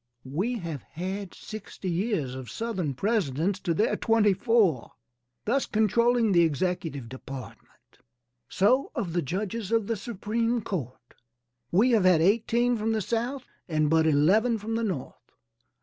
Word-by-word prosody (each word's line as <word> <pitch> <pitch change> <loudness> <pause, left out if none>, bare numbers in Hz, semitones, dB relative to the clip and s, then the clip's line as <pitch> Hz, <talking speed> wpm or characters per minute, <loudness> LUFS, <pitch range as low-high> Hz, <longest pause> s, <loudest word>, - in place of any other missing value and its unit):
We 190 - -1
have 165 - -5
had 190 - -6
sixty 215 -3 -8
years 175 - -1
of 130 -3 -7
Southern 185 - -3
presidents 190 - 0
to 170 -5 -1
their 215 - +2
twenty 225 -3 +3
four, 195 - +2 0.5
thus 265 +5 +1
controlling 230 +1 +2
the 175 -2 +5
executive 160 -4 -1
department. 130 +1 -11 0.5
So 250 +8 +2
of 175 -4 -3
the 175 - +1
judges 195 - -3
of 225 -2 +2
the 230 - -1
supreme 230 +3 -1
court, 130 - -6 0.6
we 220 +9 +4
have 215 -5 +3
had 180 -3 +6
eighteen 235 +6 +2
from 220 +1 0
the 220 - 0
South 240 +6 -2 0.3
and 155 -2 +1
but 160 0 +4
eleven 195 +11 +3
from 220 +2 -5
the 230 +1 0
North. 140 - -5
200 Hz, 145 wpm, -27 LUFS, 160-225 Hz, 0.6 s, had